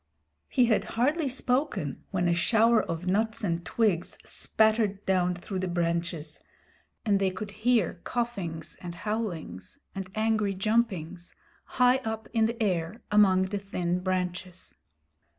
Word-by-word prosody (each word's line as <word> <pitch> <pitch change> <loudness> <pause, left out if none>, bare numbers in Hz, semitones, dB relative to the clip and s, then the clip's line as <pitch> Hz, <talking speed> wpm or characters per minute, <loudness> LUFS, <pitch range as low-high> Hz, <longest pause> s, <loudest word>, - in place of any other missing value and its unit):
He 250 -3 +4
had 225 -2 +2
hardly 290 +6 +2
spoken 255 - -1
when 180 -3 0
a 170 - +3
shower 225 +6 +4
of 165 +1 -4
nuts 220 +4 +1
and 170 -3 -1
twigs 185 -1 0
spattered 215 -2 +1
down 180 -1 +2
through 185 +2 -5
the 185 - -1
branches; 170 -2 -2 0.7
and 200 -2 +3
they 195 -1 +2
could 200 +2 -6
hear 215 -5 +1
coughings 195 -10 -3
and 175 -1 -6
howlings 175 - -4 0.2
and 190 -1 -5
angry 215 -2 +1
jumpings 185 -5 -1 0.4
high 250 0 +6
up 220 -4 -4
in 225 -1 +3
the 230 0 -4
air 180 +1 -1
among 195 -3 +5
the 205 - 0
thin 180 -3 -2
branches. 185 0 -3
195 Hz, 135 wpm, -28 LUFS, 175-225 Hz, 0.7 s, high